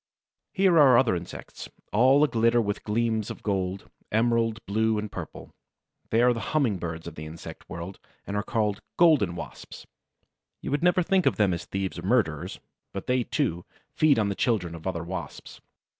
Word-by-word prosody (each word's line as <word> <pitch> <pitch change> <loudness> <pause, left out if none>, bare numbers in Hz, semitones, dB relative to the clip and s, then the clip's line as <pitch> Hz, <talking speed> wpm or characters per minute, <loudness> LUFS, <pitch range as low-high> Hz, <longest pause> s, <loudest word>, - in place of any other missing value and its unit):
Here 185 -3 +4
are 130 -5 +7
other 120 -7 +3
insects, 85 0 -8 0.2
all 130 +7 +5
aglitter 115 -2 +2
with 105 -3 -2
gleams 110 0 0
of - - -8
gold, 95 -2 -2 0.2
emerald, 115 0 +2
blue, 110 +2 +1
and 105 0 -4
purple. - - -8 0.6
They 115 +2 +3
are 125 0 +5
the 115 - -4 0.2
humming 115 -11 +1
birds 85 -1 -5
of 85 - -7
the 75 0 -8
insect 80 +1 -10
world, 85 +3 -7 0.3
and 100 - -4
are 105 - +1
called 105 -1 -1
the - - -21 0.2
Golden 150 - +4
Wasps. 85 - -9 0.7
You - - -5
would 145 - 0
never 180 +1 +3
think 185 +1 +2
of - - +3
them 100 -4 +2
as 85 - -4
thieves 95 -2 -3
or - - -8
murderers; 95 - 0 0.3
but 100 - -5
they, 125 0 +1
too, 110 - -1 0.3
feed 155 -4 +4
on 105 -2 +1
the - - 0
children 100 -6 0
of 85 +2 -7
other 85 -3 -2
Wasps. 85 -4 -7
105 Hz, 185 wpm, -26 LUFS, 90-125 Hz, 0.7 s, are